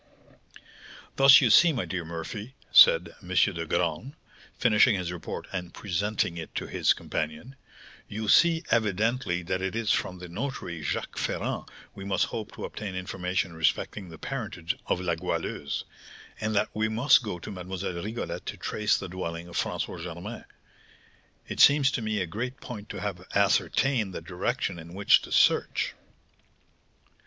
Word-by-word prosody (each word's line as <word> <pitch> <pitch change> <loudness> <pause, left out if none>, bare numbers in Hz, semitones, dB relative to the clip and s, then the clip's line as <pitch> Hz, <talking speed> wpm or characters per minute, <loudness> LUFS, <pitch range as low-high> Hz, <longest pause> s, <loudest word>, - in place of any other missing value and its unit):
"Thus 135 0 +8
you 120 -5 +4
see, 170 +10 +7
my 130 -7 -2
dear 90 -2 -3
Murphy," 85 +9 -6 0.2
said 85 0 +7
M. 90 - -14
de 90 -2 +1
Graün, 85 - -1 0.4
finishing 110 -1 +4
his 90 -2 -3
report 90 -2 -6
and 90 -3 -5
presenting 100 -2 -1
it 80 - -8
to - - -2
his - - +2
companion, 80 - -5 0.5
"you 110 +1 -5
see 165 +8 +5
evidently 110 -3 +1
that 95 +2 -2
it 95 +2 -2
is 115 -2 0
from 90 - 0
the 90 0 -9
notary, 90 - -5
Jacques 75 - -3
Ferrand, - - -2 0.3
we 95 - -9
must 95 -1 +1
hope 110 -2 -6
to - - -6
obtain 100 -3 -6
information 90 0 -2
respecting 85 +4 -1
the 80 - -10
parentage 105 - -4
of - - +1
La 90 -2 0
Goualeuse, 75 -3 -3 0.6
and 110 -1 -1
that 100 - +2
we 110 +1 0
must 125 +6 +5
go 105 -7 -4
to 85 - -8
Mlle. 90 -1 -5
Rigolette 110 +3 -5
to - - -4
trace 105 -1 0
the - - -5
dwelling 85 -2 -5
of 85 - -11
François - - -2
Germain. 90 +6 -7 1.0
It - - -6
seems 140 -2 +6
to 130 - -2
me 110 -2 -1
a - - 0
great 120 +9 -5
point 105 -4 -8
to - - -6
have 95 -3 -5
ascertained 100 +1 +2
the - - -4
direction 90 0 -2
in 85 +2 -11
which 100 +1 +5
to - - -10
search." - - +3
95 Hz, 160 wpm, -27 LUFS, 85-110 Hz, 1.0 s, Thus